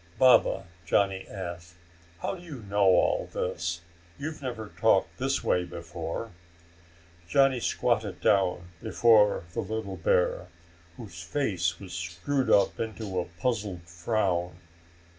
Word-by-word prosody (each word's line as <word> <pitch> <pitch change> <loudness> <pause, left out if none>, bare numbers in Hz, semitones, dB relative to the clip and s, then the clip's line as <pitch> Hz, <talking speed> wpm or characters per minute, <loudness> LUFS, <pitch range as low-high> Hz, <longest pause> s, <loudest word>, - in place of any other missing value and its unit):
"Baba," 125 -6 +5 0.2
Johnny 95 +2 +1
asked, 85 -3 -7 0.5
"how - - -1
do 185 - -9
you 150 -9 -9
know 100 0 +2
all 95 -1 +3
this? 85 0 -2 0.4
You've 155 +1 -5
never 120 -5 -5
talked - - +2
this - - 0
way 90 - +2
before." 85 +5 -6 1.0
Johnny 135 +3 +4
squatted - - 0
down 90 -3 +2
before 105 -5 +4
the - - -3
little 110 -3 -4
bear, 90 +2 +1 0.5
whose 95 -8 -9
face 90 - -1
was 95 -3 -9
screwed 90 +11 -2
up 100 -1 +4
into 110 -4 -3
a 90 - -2
puzzled 95 +1 -3
frown. 90 0 -1
95 Hz, 120 wpm, -28 LUFS, 85-110 Hz, 1.0 s, Baba